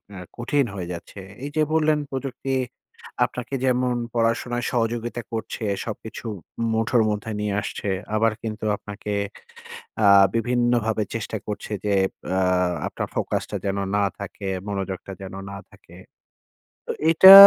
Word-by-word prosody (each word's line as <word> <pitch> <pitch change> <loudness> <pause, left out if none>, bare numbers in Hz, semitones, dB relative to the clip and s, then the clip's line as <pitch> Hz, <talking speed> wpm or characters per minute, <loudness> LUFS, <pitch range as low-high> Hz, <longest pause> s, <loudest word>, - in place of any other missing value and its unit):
আ - - -7 0.2
কঠিন 135 +3 +2
হয়ে 90 -3 -4
যাচ্ছে। 85 +3 -8 0.2
এই 145 - -2
যে 155 - +3
বললেন 155 -1 +4
প্রযুক্তি, 135 0 -3 0.7
আপনাকে 125 +2 -6
যেমন 125 -1 +2 0.2
পড়াশোনায় 120 +1 +1
সহযোগিতা 120 0 0
করছে, 110 +1 -4 0.2
সবকিছু 110 +1 -6 0.5
মুঠোর 115 +1 +3
মধ্যে 105 +1 -2
নিয়ে 105 -1 0
আসছে 100 - -3 0.3
আবার 115 +1 +4
কিন্তু 110 -1 -3
আপনাকে 105 0 -6 0.9
আ - - +6 0.3
বিভিন্নভাবে 120 -2 +2
চেষ্টা 110 0 -2
করছে 105 0 -4
যে 100 - +2 0.4
আ - - +3 0.5
আপনার - - -3
ফোকাস - - 0
টা - - -4
যেন 100 0 0 0.2
না 105 - +3 0.2
থাকে, 100 0 -6 0.2
মনোযোগটা 95 -1 -3
যেন 95 0 -7 0.2
না 100 - -6
থাকে। - - -16 0.9
তো - - 0 0.2
এটা 190 +4 +11
115 Hz, 135 wpm, -24 LUFS, 105-125 Hz, 0.9 s, এটা